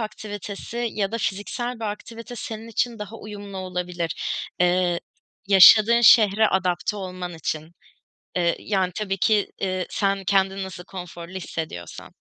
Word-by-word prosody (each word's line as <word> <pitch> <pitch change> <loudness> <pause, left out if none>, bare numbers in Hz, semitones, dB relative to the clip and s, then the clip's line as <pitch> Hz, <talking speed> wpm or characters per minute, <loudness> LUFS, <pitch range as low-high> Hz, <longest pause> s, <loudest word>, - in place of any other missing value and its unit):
aktivitesi 215 +2 -5
ya 200 0 -1
da 230 - -1
fiziksel 235 +4 -3
bir - - -3
aktivite 230 +3 -6
senin 225 0 -6
için 230 0 -1
daha 210 +2 -7
uyumlu 205 -2 -9
olabilir. 180 -2 -3 0.5
Eee, 180 -1 +2 0.5
yaşadığın 215 +4 +8
şehre 215 -2 +6
adapte 185 +1 0
olman 180 -2 -6
için, 160 0 -4 0.6
eee, 170 -2 +2
yani, 190 -3 0
tabii 195 -2 -2
ki, 210 +1 +2
eee, 185 -1 -1
sen 195 -1 0
kendini 195 0 +1
nasıl 185 -1 -8
konforlu 175 -2 -9
hissediyorsan. 160 - -6
195 Hz, 130 wpm, -24 LUFS, 180-215 Hz, 0.6 s, yaşadığın